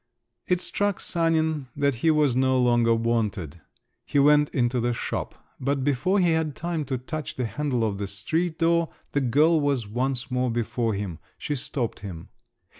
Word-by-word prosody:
It 180 -1 +1
struck 205 0 -1
Sanin 160 -4 0
that 140 -1 +2
he 165 - +3
was 150 -5 +3
no 130 0 +3
longer 120 -2 +3
wanted; 110 -8 -1 0.4
he - - -2
went 150 +1 +5
into 125 -1 0
the 120 0 0
shop. - - -4 0.2
But 135 +1 0
before 145 +8 +1
he 175 -2 +3
had 160 -3 0
time 170 -2 -3
to 130 -1 -2
touch 150 +4 -5
the 125 - -1
handle 130 -1 -1
of 100 -3 -1
the 100 - -2
street 160 - -2
door, 170 0 +2 0.2
the 145 - +1
girl 150 +6 +4
was 140 -6 0
once 125 +3 -2
more 125 0 +1
before 115 -1 -1
him; 95 -5 -4 0.2
she 150 - -3
stopped 125 -3 -3
him. 90 -5 -8
130 Hz, 175 wpm, -25 LUFS, 115-155 Hz, 0.4 s, went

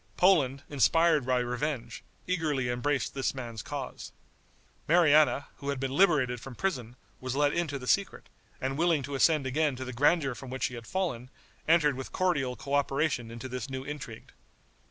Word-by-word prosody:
Poland, 145 -8 +3
inspired 150 0 +3
by 130 -1 +2
revenge, 125 0 -3 0.2
eagerly 155 -8 0
embraced 135 +3 -1
this 135 0 -1
man's 120 -4 -6
cause. - - -6 0.8
Mariana, 155 -3 +4
who 140 - -5
had 140 -2 -2
been 135 0 -2
liberated 140 -8 +3
from 135 -1 -9
prison, 125 - -3 0.2
was 130 0 -4
let 145 0 +2
into 160 -5 -1
the 125 - -9
secret, 200 +9 0 0.3
and 135 +2 -3
willing 165 -4 +2
to 140 +2 -6
ascend 150 +1 +3
again 145 +1 +1
to 130 +1 -6
the 130 - -6
grandeur 140 +1 +2
from 130 +1 -9
which 130 +1 -5
she - - 0
had 115 -1 -8
fallen, 150 -11 -2 0.4
entered 155 -4 +4
with 130 0 -7
cordial 145 -9 0
coöperation 140 -3 0
into 115 +2 -7
this 125 0 -5
new 130 0 -4
intrigue. 140 -5 -8
135 Hz, 170 wpm, -29 LUFS, 125-155 Hz, 0.8 s, Mariana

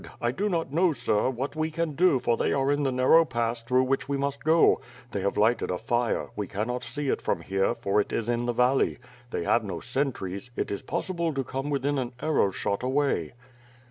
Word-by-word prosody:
I 120 - 0
do 205 +10 -1
not 165 -6 -2
know, 170 +1 +3
sir, 110 -3 +1
what 130 +3 -4
we 155 0 0
can 165 0 -2
do 175 -1 +4
for 120 -1 +1
they - - 0
are 135 0 +1
in 145 0 +1
the 135 -2 +1
narrow 130 +6 +5
pass 120 -5 -2
through 125 +2 +2
which 135 +1 -1
we 140 - 0
must 140 0 -2
go. 160 +2 +4 0.3
They 100 - -2
have 100 +1 -1
lighted 110 +3 +2
a 90 - -1
fire; 120 +3 -1
we 105 -2 -3
cannot 115 +6 -3
see 145 +2 -3
it - - 0
from - - -1
here, 95 +4 0
for 105 -3 +1
it - - -6
is 115 - -2
in 120 0 0
the - - +2
valley. 125 +3 +2 0.3
They 85 - -3
have 115 +6 +2
no 95 -5 -4
sentries; 120 -5 -3
it - - -2
is 100 - -3
possible 170 -5 -2
to 135 - 0
come 135 +3 -4
within 140 0 0
an 125 -1 -4
arrow 155 -10 +2
shot 100 +1 -2
away." 130 - 0
130 Hz, 225 wpm, -27 LUFS, 115-145 Hz, 0.3 s, narrow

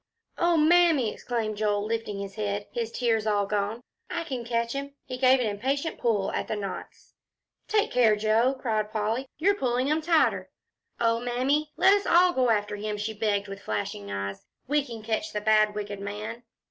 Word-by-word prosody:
"Oh, 345 -1 +3
Mammy!" 315 -6 +4
exclaimed 220 -3 -3
Joel, 205 -1 0
lifting 225 -2 -3
up - - -4
his 195 0 -8
head, 205 -1 -3
his 230 -1 -3
tears 225 -3 0
all 205 -1 +2
gone. 210 +3 -2 0.3
"I 340 - -2
can 260 -7 -4
catch 235 0 -1
him." 280 0 -5
He 255 - -5
gave 260 +1 +4
an 250 - 0
impatient 265 +9 -2
pull 215 -5 +1
at - - -2
the - - -2
knots. 200 -2 -7 0.5
"Take 430 +1 +1
care, 230 -4 +4
Joe," 220 +5 +2
cried 215 -4 -1
Polly, 225 +5 -1
"you're 385 +6 +3
pulling 255 -5 0
'em 310 +1 +1
tighter. 320 0 +2 0.5
Oh, 230 0 +2
Mammy, 260 +5 0
let 390 - +6
us 405 0 +1
all 355 +1 +5
go 255 -4 +2
after 210 -2 0
him," 210 0 -3
she 210 +2 -3
begged 205 -1 0
with 195 0 -8
flashing 100 - -4
eyes. 100 0 -4 0.2
"We 295 +1 +2
can 230 -5 -9
catch 230 +9 -2
the 210 - -1
bad 215 -1 +3
wicked 205 -1 -5
man." 210 +4 -6
230 Hz, 190 wpm, -27 LUFS, 210-270 Hz, 0.5 s, let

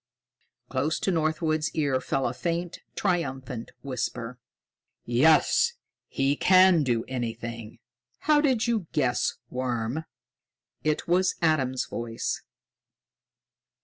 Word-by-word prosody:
Close 155 +3 0
to 195 - +1
Northwood's 155 -1 0
ear 140 -4 +1
fell 135 - -1
a 120 - -2
faint, 170 +4 -3 0.2
triumphant 135 - -2
whisper: 125 -2 -4 0.7
"Yes, 155 - +4 0.3
he 135 +1 +1
can 185 0 +6
do 120 -5 +1
anything. 115 -2 -5 0.4
How 300 -1 +4
did 260 -6 +2
you 225 -7 0
guess, 125 -4 +1 0.2
worm?" 125 +3 -2 0.8
It 155 -1 0
was 180 +2 +2
Adam's 130 -6 +2
voice. 115 -1 -3
145 Hz, 100 wpm, -27 LUFS, 125-170 Hz, 0.8 s, can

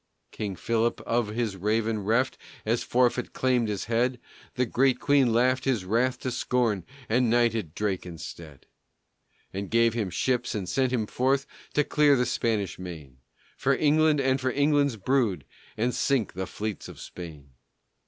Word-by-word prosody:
King 100 -3 -4
Philip, 115 +3 0
of 115 -1 0
his 110 -1 -2
raven 110 +3 0
reft, 115 +6 +1 0.3
As 115 +2 +1
forfeit 125 0 +1
claimed 125 -3 +1
his 105 -2 -3
head. 120 +2 0 0.4
The 125 - +2
great 130 +2 +2
Queen 140 -4 +3
laughed 125 +3 +2
his 120 -8 0
wrath 120 +6 +1
to 130 - -2
scorn, 115 -8 0 0.2
And 120 +1 +2
knighted 115 -8 +1
Drake 100 -3 -1
instead. 80 -3 -9 0.9
And 100 0 -4
gave 115 0 +3
him 110 -5 -1
ships 120 +8 -1
and 100 -4 -3
sent 130 +7 +1
him 120 -4 0
forth 135 +5 +1 0.3
To 150 - +4
clear 145 -1 +4
the 125 -1 +2
Spanish 110 -6 -1
main 80 -8 -9 0.4
For 135 +1 +2
England 155 0 +3
and 135 0 +1
for 130 - +1
England's 140 -2 +2
brood, 105 - 0 0.3
And 120 +3 +1
sink 135 -8 0
the 95 +1 -4
fleets 105 -2 -5
of - - -11
Spain. 75 -6 -10
115 Hz, 160 wpm, -27 LUFS, 105-130 Hz, 0.9 s, To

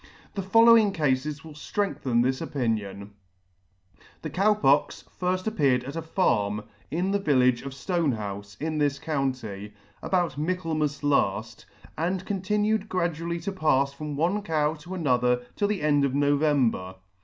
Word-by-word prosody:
The 200 - -3
following 225 +1 +6
Cafes 145 -1 -1
will 160 -1 -10
ftrengthen 145 - -1
this 130 +3 0
opinion: 105 -9 -3 1.1
The - - -4
Cow 210 +3 +3
Pox 145 -8 +2 0.2
appeared 180 - +1
at 140 +4 -7
a 165 - -2
farm 105 - 0 0.3
in 180 +5 -1
the 200 - +1
village 130 -8 +3
of 140 - -6
Stonehoufe, 110 - -3
in 155 0 -2
this 145 -1 +1
county, 130 -9 -3 0.3
about 175 -7 0
Michaelmas 155 -3 -1
laft, 145 -1 0 0.3
and 180 +3 -1
continued 210 +2 0
gradually 170 -1 -2
to 200 - -3
pafs 140 -7 +1
from 150 +1 -6
one 175 +8 +1
cow 155 -5 0
to 165 +4 -8
another 125 -6 +1
till 205 - +1
the 205 -6 -2
end 145 -2 +3
of 135 -1 0
November. 140 -10 +1
150 Hz, 140 wpm, -26 LUFS, 130-180 Hz, 1.1 s, following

